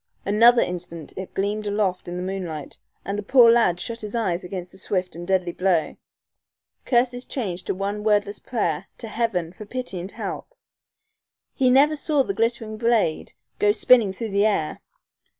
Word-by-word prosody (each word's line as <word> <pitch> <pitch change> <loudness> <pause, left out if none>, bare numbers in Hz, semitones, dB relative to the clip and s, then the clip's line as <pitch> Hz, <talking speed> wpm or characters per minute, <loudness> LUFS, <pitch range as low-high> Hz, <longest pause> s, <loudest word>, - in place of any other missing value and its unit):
Another 230 +4 +6
instant 170 -3 -6
it 190 0 -6
gleamed 205 +2 -1
aloft 200 -3 -1
in 175 0 -5
the 180 - -3
moonlight, 180 -6 -5 0.3
and 200 +1 -2
the - - -2
poor 235 +2 +6
lad 230 -7 +3
shut 230 +5 -5
his 210 +1 -5
eyes 190 -6 -1
against 180 0 -6
the 190 - -10
swift 185 -3 -2
and 175 +1 -7
deadly 185 -2 +1
blow. 180 -3 0 0.9
Curses 245 0 +2
changed 190 -11 -4
to - - -1
one 200 +2 -3
wordless 205 -1 +1
prayer 175 -11 -2
to 230 - -8
heaven 205 -7 -1
for 210 +2 -10
pity 250 -6 -5
and 185 +3 -6
help. - - -6 1.0
He 260 -3 +2
never 280 +4 +5
saw 295 -2 +1
the 195 - -3
glittering 225 0 -1
blade 225 -8 +1 0.3
go 210 - +4
spinning 220 -1 +4
through 220 +4 -5
the 200 +1 +3
air. 160 -8 -1
205 Hz, 170 wpm, -23 LUFS, 180-230 Hz, 1.0 s, Another